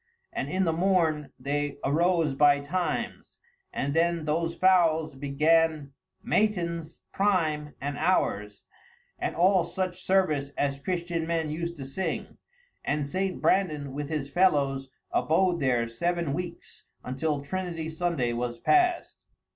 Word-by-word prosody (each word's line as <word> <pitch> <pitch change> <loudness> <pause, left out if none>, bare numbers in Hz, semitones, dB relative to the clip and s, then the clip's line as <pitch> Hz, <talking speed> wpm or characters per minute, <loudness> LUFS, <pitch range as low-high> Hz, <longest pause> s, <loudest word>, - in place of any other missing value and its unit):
And - - -3
in 190 +1 +1
the 165 - +1
morn 165 -4 +1
they 145 +1 -2
arose 165 +1 +2
by 145 +1 +5
times, 175 +6 -3 0.3
and 140 +1 -2
then 165 0 +1
those 165 +2 0
foules 165 -4 +3
began 150 +1 +1 0.3
mattyns, 170 -6 0
prime, 155 -7 0
and 140 +1 -4
hours, 105 - 0 0.6
and - - -2
all 185 +1 +4
such 185 0 -3
service 180 -8 +1
as 140 -1 0
Christian 170 0 -2
men 165 -2 -1
used 170 +2 -3
to 140 -4 -7
sing; 165 +8 -4 0.4
and 145 -1 0
St. 185 +5 -2
Brandan, 150 -8 +1
with 145 +1 -4
his 150 -3 -2
fellows, 140 -5 +2 0.2
abode 175 +2 +2
there 125 -4 +1
seven 170 +5 -1
weeks, 175 +2 -6 0.2
until 140 +4 -1
Trinity 170 0 -4
Sunday 160 -7 -1
was 120 0 -3
passed." 360 - +2
160 Hz, 130 wpm, -27 LUFS, 140-180 Hz, 0.6 s, by